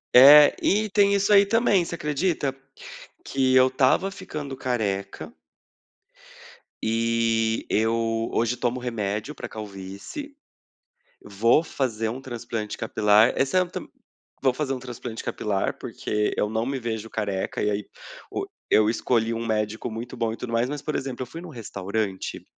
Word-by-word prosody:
É, 145 +3 +10
e 210 +1 +2
tem 200 0 +4
isso 200 +1 +2
aí 200 0 +8
também, 205 -3 +3
você 170 - -5
acredita? 150 -2 -1 0.7
Que 130 -1 +1
eu 130 0 +7
estava 130 +9 +2
ficando 150 -8 -6
careca 105 -7 -3 1.5
e 115 0 +1
eu 115 +1 0
hoje 120 +2 +1
tomo 125 +1 -1
remédio 115 +2 -3
para - - -7
calvície. 105 - -8 0.9
Vou 115 +9 +3
fazer 115 -8 -2
um 125 +4 -5
transplante 120 -4 -5
capilar, 110 0 +4
esse 135 +6 +1
é 185 - +5
tam 175 - -7 0.6
vou 130 -2 +4
fazer 135 0 -2
um 130 - -4
transplante 120 -2 -7
capilar, 100 -2 -2
porque 105 0 -2
eu 105 - 0
não 110 +1 -1
me 135 +2 -2
vejo 110 -3 -4
careca, 100 -4 -2
e 105 - +2
aí 105 0 -2 0.5
o 395 - -3 0.2
eu 110 0 +5
escolhi 115 0 +1
um 115 +1 -4
médico 110 0 -1
muito 115 +2 -7
bom 115 -1 -1
e - - -5
tudo 125 - -6
mais, 115 +1 +1
mas 145 +1 -5
por 155 - -3
exemplo, 135 -2 -4
eu - - -9
fui 165 - -9
em - - -10
um - - -9
restaurante 100 -5 -4
115 Hz, 155 wpm, -25 LUFS, 110-140 Hz, 1.5 s, É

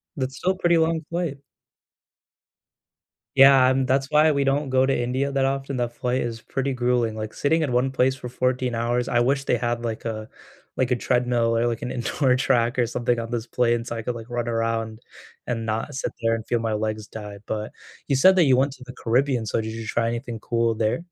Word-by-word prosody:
That's 130 -1 -3
still 185 - +1
a - - -3
pretty 175 -2 +3
long 160 0 +1
flight. 170 -5 -3 2.0
Yeah, 135 -1 +7
and 130 0 +1
that's 135 +1 +1
why 155 +1 +5
we 140 -1 +1
don't 135 +1 0
go 130 0 +3
to 135 - +1
India 130 +3 -1
that 135 -1 +1
often. 135 0 -2
That 120 -1 -2
flight 125 +1 -1
is 115 -1 -4
pretty 135 +3 -2
grueling, 120 -3 0
like, 110 0 -5
sitting 160 +3 +1
in 145 -5 -1
one 125 +2 +1
place 130 0 +2
for 125 -3 -8
14 125 0 -1
hours, 120 +1 0
I 120 - +2
wish 135 +3 +1
they 125 - +2
had, 120 0 -2
like, 115 -2 -4
a 110 -1 -4 0.5
like, 130 -1 0
a 125 - +4
treadmill 120 -1 +1
or 120 - +2
like 115 -1 -1
an 125 - -4
indoor 125 +2 +1
track 125 -2 +1
or 120 - +3
something 120 +1 -1
on 115 +1 -5
this 120 0 -3
plane 120 -1 +1
so 115 0 -5
I 115 - -5
could, 125 - -2
like, 115 0 -9
run 120 -1 -2
around 115 -1 -2 0.5
and 115 -2 -2
not 115 +6 -3
sit 130 - -2
there 115 0 +2
and 110 -1 -6
feel 120 0 0
my 115 -1 -1
legs 110 0 -3
die, 105 -2 -8
but, 110 0 -3 0.4
you 140 - +2
said 190 +8 +6
that 180 - +5
you 135 -3 +5
went 135 +2 +1
to 130 - -13
the 125 - -9
Caribbean, 125 0 0
so, 110 - 0
did 110 0 -3
you 115 -1 -6
try 115 0 0
anything 115 -1 -4
cool 115 +1 0
there? 110 +9 0
125 Hz, 225 wpm, -24 LUFS, 115-135 Hz, 2.0 s, Yeah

